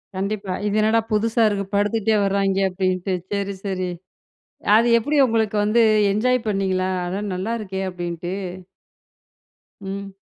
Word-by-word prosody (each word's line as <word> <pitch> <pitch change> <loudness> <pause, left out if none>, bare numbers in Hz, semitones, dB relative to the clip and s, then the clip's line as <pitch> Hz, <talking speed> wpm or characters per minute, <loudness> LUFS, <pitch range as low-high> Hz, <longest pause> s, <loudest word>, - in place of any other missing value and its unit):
கண்டிப்பா, 195 0 -3
இது 205 0 0
என்னடா 220 +1 +3
புதுசா 225 +2 +2
இருக்கு? 200 -1 -2
படுத்துட்டே 215 +1 +1
வராய்ங்க 195 0 +1
அப்டின்ட்டு, 185 0 -1 0.2
சரி 200 -1 -2
சரி. 185 -2 -2 0.9
அது 230 +2 +4
எப்டி 290 +6 -1
உங்களுக்கு 220 -2 0
வந்து, 225 +3 +3 0.3
என்ஜாய் 250 +4 +2
பண்ணீங்களா? 190 -2 0 0.2
அட 190 +3 -3
நல்லா 195 +6 -2
இருக்கே 190 -2 -4
அப்டின்ட்டு. 175 0 -5 1.5
ம். 195 0 -6
200 Hz, 120 wpm, -22 LUFS, 190-215 Hz, 1.5 s, அது